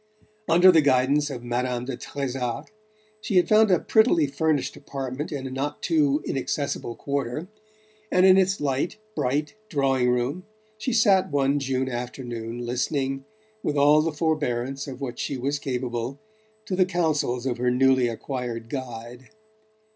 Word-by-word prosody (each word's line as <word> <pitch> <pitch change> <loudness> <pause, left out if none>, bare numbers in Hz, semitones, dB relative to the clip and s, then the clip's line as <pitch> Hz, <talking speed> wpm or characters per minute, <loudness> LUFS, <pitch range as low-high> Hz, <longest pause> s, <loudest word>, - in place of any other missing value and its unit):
Under 175 +3 +7
the 165 -3 +5
guidance 140 +2 +3
of 125 -4 -6
Madame 120 0 -2
de 130 -1 -4
Trezac 135 +1 -4 0.5
she 205 - -3
had 180 - +5
found 215 0 +5
a 180 - +5
prettily 220 -8 +4
furnished 145 +1 0
apartment 135 +1 -5
in 140 -3 -4
a 130 - -5
not 140 +3 -4
too 150 -3 +2
inaccessible 135 -3 -2
quarter, 140 +3 -3 0.6
and 185 +1 +5
in 190 -1 +8
its 190 +1 +2
light 140 +5 -1 0.2
bright 145 +4 -1 0.2
drawing 135 -4 +2
room 125 +8 -1 0.4
she 235 +4 -2
sat 205 -5 +4
one 140 0 +2
June 130 -1 -1
afternoon 120 -1 -5
listening, 135 +2 -1 0.4
with 145 -6 -1
all 145 +2 +6
the 165 +1 0
forbearance 140 -4 -1
of 135 -1 -8
which 125 -3 -5
she 140 - -2
was 140 +3 -1
capable, 125 -1 -3 0.5
to 190 - -2
the 185 0 +4
counsels 155 -8 0
of 125 -2 -1
her 125 0 +2
newly 130 0 +3
acquired 115 -1 -4
guide. 125 -1 -7
135 Hz, 150 wpm, -25 LUFS, 125-150 Hz, 0.6 s, in